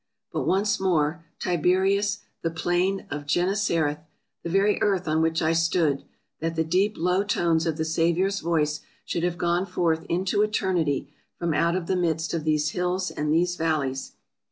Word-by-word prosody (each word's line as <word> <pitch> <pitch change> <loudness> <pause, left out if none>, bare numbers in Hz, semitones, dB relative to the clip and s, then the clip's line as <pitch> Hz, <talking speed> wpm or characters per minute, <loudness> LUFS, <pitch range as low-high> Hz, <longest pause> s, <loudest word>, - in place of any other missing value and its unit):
But - - -2
once 200 +2 +2
more 165 -3 +1
— 165 - -39
" - - -51
Tiberias 190 +4 +2
— - - -50
the 165 - 0
plain 175 +4 0
of 145 0 -5
Gennesareth 175 -4 +1 0.2
— - - -55
the 170 - -4
very 195 +4 +2
earth 190 -4 +1
on 155 +1 +2
which 160 0 +1
I 160 +1 +2
stood 165 -3 +1 0.2
— - - -52
that 165 +1 -2
the 160 - +1
deep, 190 +6 +1
low 180 +3 +2
tones 170 -5 +1
of 160 -1 -1
the 160 - -1
Saviour's 170 +5 +1
voice 155 -3 0 0.3
should 170 - -2
have 175 0 -1
gone 175 +2 0
forth 165 -3 0
into 190 +4 +1
Eternity 185 -9 0 0.2
from 170 -2 -1
out 170 +3 +2
of 185 -2 -2
the 190 - 0
midst 165 -2 0
of 160 -2 -2
these 150 -1 +1
hills 180 +1 -1
and 150 0 -2
these 175 +2 +2
valleys!" 150 -6 -1
170 Hz, 190 wpm, -25 LUFS, 160-185 Hz, 0.3 s, once